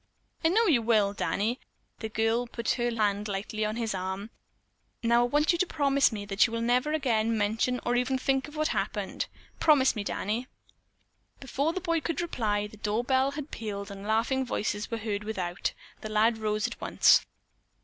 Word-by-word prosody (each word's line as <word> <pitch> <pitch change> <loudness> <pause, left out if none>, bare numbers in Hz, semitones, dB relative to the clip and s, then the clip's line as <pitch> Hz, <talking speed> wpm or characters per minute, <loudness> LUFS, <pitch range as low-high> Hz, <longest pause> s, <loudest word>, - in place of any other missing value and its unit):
"I - - +5
know 445 +6 +3
you 285 - +4
will, 215 -3 +3
Danny," 215 +4 -1 0.4
the 220 - -4
girl 225 +3 +1
put 235 -1 -2
her 240 -1 0
hand 210 -2 0
lightly 205 +2 -3
on 215 0 -1
his 230 -2 -2
arm. 190 +3 -4 0.7
"Now, 235 +1 +4
I 240 - +3
want 295 +5 +3
you 345 - -1
to 370 - +2
promise 280 -4 +3
me 205 -2 -5
that 200 0 +3
we - - -9
will 230 0 -2
never 250 +5 +2
again 230 -7 +1
mention 220 +4 0
or 245 - +1
even 250 +2 +1
think 270 +1 0
of 300 - -12
what 310 0 0
happened. - - -2 0.3
Promise 285 -5 +4
me, 210 - -2
Danny." 220 +5 -2 0.9
Before 280 +3 -1
the 370 - -4
boy 335 -2 0
could 330 - -2
reply, 215 -11 -1
the 210 +1 -11
door 215 +2 -1
bell 265 +1 +2
had 300 0 -6
pealed 200 -2 -5
and 200 +1 -8
laughing 230 +5 +1
voices 210 -3 -2
were 230 - -2
heard 210 -2 -3
without. 185 -5 -2 0.3
The 215 - -6
lad 220 +2 +2
rose 215 -1 0
at - - -5
once. - - +5
230 Hz, 190 wpm, -28 LUFS, 210-265 Hz, 0.9 s, I